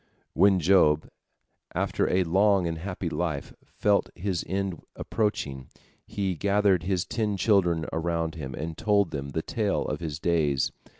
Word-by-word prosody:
" - - -40
When 95 +1 +4
Job, 80 -3 +4 0.7
after - - 0
a 95 +1 +3
long 95 +2 +3
and 80 -1 -3
happy 90 0 -4
life, 80 -4 -3
felt 105 -1 +1
his 90 -1 -2
end 95 -2 -2
approaching, 70 - -2 0.4
he 95 -2 -2
gathered 100 +1 +2
his 90 0 -1
ten 105 0 -1
children 90 -5 +2
around 80 0 -1
him, 70 -5 -6
and 80 +1 -5
told 100 -1 +2
them 70 -1 -4
the 80 +3 -3
tale 105 -3 -1
of - - -3
his 80 -4 -4
days. 80 -5 +1
90 Hz, 155 wpm, -27 LUFS, 80-100 Hz, 0.7 s, When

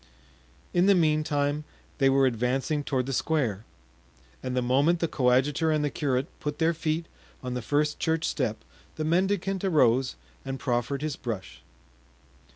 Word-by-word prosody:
In 175 +2 +3
the 200 - +6
meantime 150 -3 +1 0.4
they 135 -1 +5
were 135 0 +4
advancing 130 +5 0
toward 130 -3 -1
the 135 - -3
square, 120 -6 0 0.8
and 130 0 -3
the - - +3
moment 140 +8 +3
the 165 - +1
coadjutor 135 +4 +2
and 155 -1 +1
the 145 - -1
curate 135 -3 0
put 150 0 -4
their 165 +1 +2
feet 160 0 -2 0.4
on 125 -1 -3
the 125 - -3
first 150 +5 0
church 160 -1 0
step 110 -6 -1 0.4
the 155 - -3
mendicant 190 +3 +1
arose 130 - +3 0.3
and 135 0 -5
proffered 125 +3 -1
his 155 -2 -2
brush. 95 - -6
145 Hz, 155 wpm, -27 LUFS, 125-160 Hz, 0.8 s, the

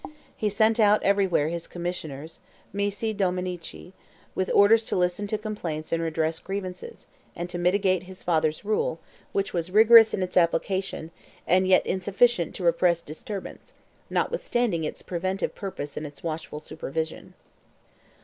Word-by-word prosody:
He 215 - 0
sent 220 +2 +2
out 210 -1 +5
everywhere 190 -6 +2
his 170 0 -5
commissioners 165 -4 -6 0.3
(missi 205 +2 -1
dominici) 180 -2 -3 0.4
with 185 - -1
orders 220 +3 +5
to - - -1
listen 180 +3 0
to 215 - -1
complaints 180 -8 -5
and 165 - +1
redress 160 0 -1
grievances, 185 -2 -6 0.3
and 175 0 -4
to 175 - -4
mitigate 185 0 +2
his 185 +1 -11
father's 160 0 0
rule, 340 - 0 0.3
which 195 0 -1
was 170 0 -2
rigorous 220 +2 +8
in 190 - -1
its 185 0 -3
application, 175 0 0 0.3
and 185 +2 +3
yet 185 - +5
insufficient 190 +1 +1
to 185 - -6
repress 170 0 +3
disturbance, 195 - -8 0.3
notwithstanding 240 - 0
its - - -6
preventive 185 +2 -2
purpose 185 -8 -6
and 150 - -4
its 145 -1 -13
watchful 160 -2 -4
supervision. 160 +1 -5
185 Hz, 140 wpm, -26 LUFS, 165-200 Hz, 0.4 s, rigorous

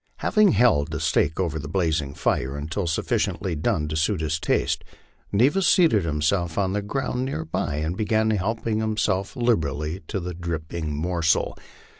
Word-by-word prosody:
Having 210 -4 +3
held 105 -13 +3
the - - -3
steak 80 +4 +1
over 85 -4 -1
the 70 - -6
blazing 80 -5 -1
fire 70 +2 -1
until 80 +6 -3
sufficiently 85 +3 -1
done 75 0 0
to 80 - -3
suit 85 +4 +1
his 80 0 -1
taste, - - 0 0.5
Neva 130 - +3
seated 165 - +4
himself 80 +3 0
on 95 -2 +1
the 105 - 0
ground 125 +4 -2
near 80 - -3
by 75 -2 -2
and 80 +4 -2
began 110 +1 +1
helping 110 +2 -1
himself 105 -2 -1
liberally 80 - 0
to 100 - -2
the 90 0 -5
dripping 80 -2 -4
morsel. 85 +1 +1
85 Hz, 160 wpm, -24 LUFS, 80-110 Hz, 0.5 s, seated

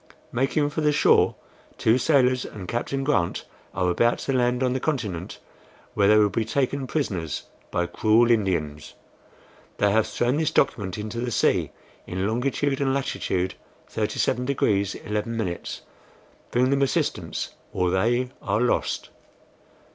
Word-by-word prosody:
Making 145 +4 +1
for 155 - -2
the 150 -1 +3
shore, 145 - +4 0.4
two 115 +3 +3
sailors 130 -2 +3
and 95 -4 -8
Captain 135 +5 -2
Grant 135 -12 0 0.3
are 90 -1 +1
about 120 +6 +2
to 135 - -2
land 125 0 +1
on 125 -1 +1
the 130 - -1
continent, 110 - -3 0.6
where 100 -2 +3
they 105 +1 +6
will 105 -1 +4
be 115 +4 0
taken 135 +3 -1
prisoners 95 - -2 0.3
by 90 - 0
cruel 115 +6 +3
Indians. 85 -9 -1 0.8
They 105 -1 +3
have 110 +1 +3
thrown 120 +4 0
this 160 -1 +1
document 105 - 0
into 110 +2 -5
the 125 +1 -2
sea, 115 - +2 0.4
in 95 +2 -2
longitude 135 +4 0
and 135 -1 +1
latitude 95 -8 -1 0.4
37 125 - 0
degrees 100 -7 +1
11". 105 -3 -3 0.9
Bring 125 +2 +2
them 140 0 +2
assistance, 135 -4 -1 0.2
or 90 -1 0
they 120 +7 +1
are - - 0
lost." 125 +1 0
120 Hz, 140 wpm, -25 LUFS, 100-130 Hz, 0.9 s, they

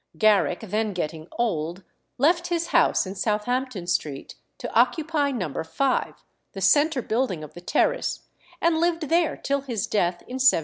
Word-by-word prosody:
Garrick, 210 -4 +3
then 215 0 -1
getting 160 -2 -4
old, 175 -5 -2 0.3
left 335 +6 +3
his 340 -1 -1
house - - +3
in 190 - -5
Southampton 215 +1 -1
Street 155 -6 -2 0.2
to - - -6
occupy 290 +5 +2
No. 180 - -3
5, 255 +12 -1 0.3
the 195 - -6
centre 285 - +3
building 220 -9 -1
of 150 - -10
the 175 - -10
terrace, - - 0 0.4
and 330 -1 +2
lived 335 -2 0
there 335 0 +2
till 280 0 -1
his 240 -6 -3
death 175 -4 0
in 255 - -6
1779. 265 -9 +6
230 Hz, 160 wpm, -25 LUFS, 180-290 Hz, 0.4 s, 1779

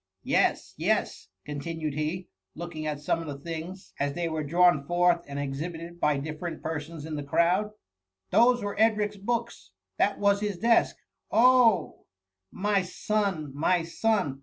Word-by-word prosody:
" - - -54
Yes! - - +1
yes! - - -1 0.2
continued 155 +1 -4
he, 155 +5 -3 0.3
looking 160 -2 -5
at 150 -1 -3
some 150 +3 0
of 165 - -7
the 145 -1 -5
things, 165 +5 -7
as 140 0 0
they 170 +2 -2
were 160 -1 -2
drawn 170 0 +4
forth 175 -1 +3
and 140 0 -6
exhibited 165 +5 -5
by 150 -3 +2
dif 155 +2 -5
ferent 170 -2 -5
persons 160 0 -5
in 160 -1 -5
the 145 - -4
crowd; 175 +8 +2 0.3
" 95 0 -58
those 245 0 +4
were 205 0 -3
Edric^s 210 -2 +2
books 235 - -3 0.2
— 95 0 -49
^that 205 - +2
was 200 0 +3
his 205 -3 -2
desk. 230 +4 +3 0.3
Oh 245 -2 +4
I - - -31 0.6
my 205 0 +2
son 185 -5 -2
I - - -9
my 175 +2 +2
son 175 -5 0
170 Hz, 175 wpm, -27 LUFS, 150-200 Hz, 0.6 s, drawn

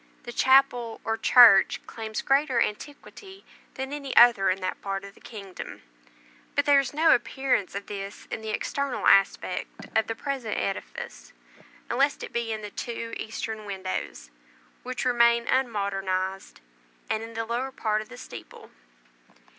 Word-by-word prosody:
The 240 - -7
chapel 255 -3 +3
or 225 - -1
church 225 -3 +7
claims 220 -1 -5
greater 275 -2 +2
antiquity 300 - -5 0.3
than 265 +1 -5
any 280 -2 -5
other 235 -5 +7
in 185 +1 0
that 185 - -4
part 195 -1 -3
of 200 0 -10
the - - -21
kingdom; 195 -5 -9 0.7
but 285 - +2
there 285 -1 +6
is 275 - -2
no 315 +2 +4
appearance 245 -5 0
of 200 0 -5
this 200 -1 -7
in - - -4
the 220 - -6
external 280 +5 -2
aspect 195 0 +2
of 220 - +3
the 225 - -3
present 260 -4 -3
edifice, - - -5 0.5
unless 275 +4 +1
it - - -8
be 235 -1 -2
in 215 -1 -4
the 205 - -7
two 230 0 -5
eastern 220 0 -5
windows, 185 - -5 0.5
which 255 0 -4
remain 235 -1 +4
unmodernized, 195 - -2 0.5
and 220 - -1
in 225 0 -9
the 225 0 -2
lower 245 +4 -2
part 215 -4 -1
of 215 - -12
the 120 - -11
steeple. - - -11
225 Hz, 155 wpm, -26 LUFS, 200-260 Hz, 0.7 s, church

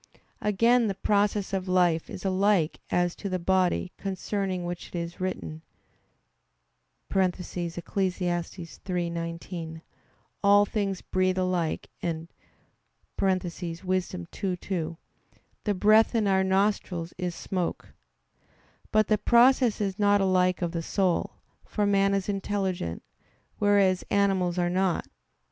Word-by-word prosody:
Again 230 +3 +3
the 195 - -2
process 205 0 +1
of 190 -1 -1
life 175 -3 +2
is 185 - -8
alike 190 -3 +2
as 175 -1 +1
to 200 - -4
the 185 - 0
body, 185 0 +1
concerning 190 -1 -2
which 175 0 -5
it - - -11
is 170 +1 -5
written 170 -4 -4 1.5
(Eccles. 185 -2 +2
3:19): 175 -1 -3 0.6
"All 205 0 +6
things 200 -3 -2
breathe 185 0 +1
alike," 185 -3 -1
and 165 -1 -3 0.9
(Wis. 195 - +3 0.3
2:2), 175 - -3 0.7
"The 210 - +2
breath 215 +5 +5
in 220 -2 +2
our 190 -1 +3
nostrils 190 -3 0
is 180 -2 -2
smoke." 180 -3 -3 1.0
But 215 -1 +3
the 215 -1 +2
process 245 0 +4
is 200 -1 -2
not 205 0 +4
alike 185 -1 +2
of 170 - -1
the 170 -1 -2
soul; 185 +1 0 0.3
for 210 - -1
man 195 0 +3
is 195 -1 -1
intelligent, 195 - -2 0.6
whereas 200 -3 +3
animals 190 -3 +2
are 175 -1 +1
not. 185 -1 0
185 Hz, 115 wpm, -27 LUFS, 175-200 Hz, 1.5 s, All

